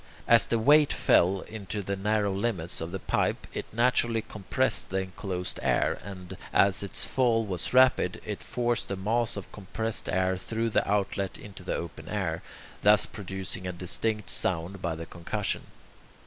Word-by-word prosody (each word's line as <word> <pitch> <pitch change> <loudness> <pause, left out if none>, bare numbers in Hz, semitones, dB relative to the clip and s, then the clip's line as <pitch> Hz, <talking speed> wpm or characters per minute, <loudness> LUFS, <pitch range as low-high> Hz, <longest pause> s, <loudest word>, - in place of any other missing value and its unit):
As 115 -1 +6
the 115 - +1
weight 145 +6 +5
fell 95 +2 +3
into 105 -1 -5
the 100 +1 -2
narrow 105 0 +1
limits 95 -6 -1
of 80 +1 -4
the 95 - -2
pipe, - - 0
it - - -4
naturally 115 -1 +2
compressed 105 -4 -1
the 95 - -1
enclosed 95 -1 -5
air, - - +1
and, 95 -3 -8 0.2
as 95 -1 +4
its 100 - 0
fall 115 -4 +2
was 95 -4 -3
rapid, 130 -8 +4
it 105 -2 -4
forced 120 -1 -1
the 100 - -2
mass 115 +4 0
of 100 - -7
compressed 110 +2 -3
air 95 0 +1
through 115 +4 -2
the - - +2
outlet 100 -1 0
into 100 -2 -11
the 90 - -2
open 85 - -6
air, 95 -6 -2 0.4
thus 105 0 +6
producing 95 -2 -5
a - - -2
distinct 95 +3 -1
sound 90 +2 -1
by 85 -2 -1
the 85 +1 -6
concussion. 85 0 -3
100 Hz, 165 wpm, -28 LUFS, 95-110 Hz, 0.4 s, As